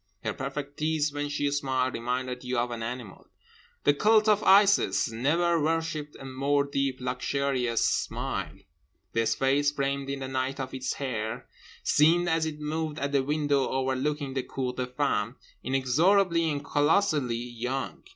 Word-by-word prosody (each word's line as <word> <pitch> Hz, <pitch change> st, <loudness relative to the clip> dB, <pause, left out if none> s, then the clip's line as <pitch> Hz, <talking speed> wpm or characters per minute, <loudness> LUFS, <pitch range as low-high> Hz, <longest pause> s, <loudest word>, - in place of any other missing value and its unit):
Her -, -, -1 dB
perfect 140 Hz, +1 st, -5 dB
teeth, 155 Hz, -1 st, 0 dB
when 145 Hz, 0 st, -3 dB
she 145 Hz, 0 st, -1 dB
smiled, 130 Hz, -2 st, 0 dB
reminded 125 Hz, +1 st, -3 dB
you 125 Hz, 0 st, -2 dB
of 120 Hz, +1 st, 0 dB
an 115 Hz, -1 st, -5 dB
animal. 115 Hz, -3 st, -6 dB, 0.6 s
The 145 Hz, -, +5 dB
cult 215 Hz, +7 st, +4 dB
of 210 Hz, -1 st, +4 dB
Isis 200 Hz, -, +4 dB
never 165 Hz, +8 st, +1 dB
worshipped 155 Hz, -1 st, -1 dB
a 135 Hz, -, -9 dB
more 140 Hz, +2 st, +1 dB
deep 140 Hz, -2 st, -1 dB
luxurious 125 Hz, -1 st, 0 dB
smile. -, -, -2 dB, 0.6 s
This 115 Hz, -1 st, +1 dB
face, 140 Hz, +2 st, +2 dB
framed 140 Hz, -1 st, -2 dB
in 140 Hz, 0 st, -3 dB
the 130 Hz, -, -3 dB
night 130 Hz, +1 st, -2 dB
of 130 Hz, -1 st, -4 dB
its 130 Hz, 0 st, -2 dB
hair, 120 Hz, -4 st, -4 dB, 0.4 s
seemed 170 Hz, +4 st, +4 dB
(as 160 Hz, -1 st, +1 dB
it 150 Hz, -1 st, -6 dB
moved 155 Hz, 0 st, -3 dB
at 140 Hz, -1 st, -2 dB
the 140 Hz, -1 st, +3 dB
window 145 Hz, -1 st, +1 dB
overlooking 135 Hz, +2 st, -1 dB
the 130 Hz, -, 0 dB
cour 125 Hz, 0 st, -4 dB
des 125 Hz, 0 st, -3 dB
femmes) 125 Hz, -4 st, -1 dB, 0.3 s
inexorably 165 Hz, +7 st, +2 dB
and 145 Hz, -1 st, -3 dB
colossally 145 Hz, -4 st, +2 dB
young. 120 Hz, +3 st, -4 dB
140 Hz, 155 wpm, -28 LUFS, 130-150 Hz, 0.6 s, The